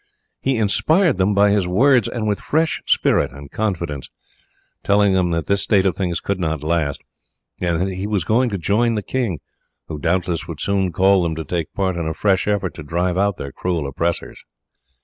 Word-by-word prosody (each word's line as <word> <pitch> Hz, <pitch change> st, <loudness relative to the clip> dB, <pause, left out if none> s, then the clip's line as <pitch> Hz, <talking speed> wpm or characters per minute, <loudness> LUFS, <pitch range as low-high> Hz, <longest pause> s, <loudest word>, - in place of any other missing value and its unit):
He 135 Hz, -2 st, 0 dB
inspired 155 Hz, -, +2 dB
them 95 Hz, +2 st, +2 dB
by 100 Hz, 0 st, +5 dB
his 100 Hz, -3 st, +1 dB
words 120 Hz, +5 st, +3 dB
with 110 Hz, -4 st, -1 dB
fresh 160 Hz, +1 st, 0 dB
spirit -, -, +2 dB
and 70 Hz, +1 st, -11 dB
confidence, 85 Hz, -10 st, -3 dB, 0.7 s
telling 100 Hz, -1 st, +3 dB
them 90 Hz, -2 st, +2 dB
that 85 Hz, -1 st, -1 dB
this 100 Hz, 0 st, +1 dB
state 100 Hz, -2 st, +2 dB
of 95 Hz, -4 st, +1 dB
things 90 Hz, -4 st, -1 dB
could 100 Hz, -1 st, -3 dB
not 80 Hz, -4 st, -2 dB
last, 80 Hz, -3 st, -1 dB, 0.6 s
and 85 Hz, -2 st, 0 dB
that 95 Hz, +2 st, 0 dB
he 95 Hz, +2 st, -4 dB
was 105 Hz, -4 st, 0 dB
going 120 Hz, +8 st, +2 dB
to 100 Hz, -, -2 dB
join 110 Hz, +6 st, +1 dB
the 105 Hz, -, -2 dB
king, 115 Hz, -, -2 dB, 0.5 s
who 75 Hz, -2 st, -5 dB
doubtless 85 Hz, 0 st, -1 dB
would -, -, -7 dB
soon 95 Hz, -2 st, 0 dB
call 95 Hz, +2 st, +4 dB
them 85 Hz, -2 st, -1 dB
to 80 Hz, 0 st, -5 dB
take 85 Hz, 0 st, -3 dB
part 95 Hz, -3 st, 0 dB
in 85 Hz, -2 st, -2 dB
a 80 Hz, -, -3 dB
fresh 95 Hz, -2 st, +1 dB
effort 100 Hz, -4 st, 0 dB
to 80 Hz, -, -9 dB
drive 85 Hz, +4 st, -1 dB
out 100 Hz, -1 st, +1 dB
their 70 Hz, -, -6 dB
cruel 85 Hz, -2 st, -2 dB
oppressors. 85 Hz, +5 st, -3 dB
95 Hz, 195 wpm, -20 LUFS, 85-105 Hz, 0.7 s, by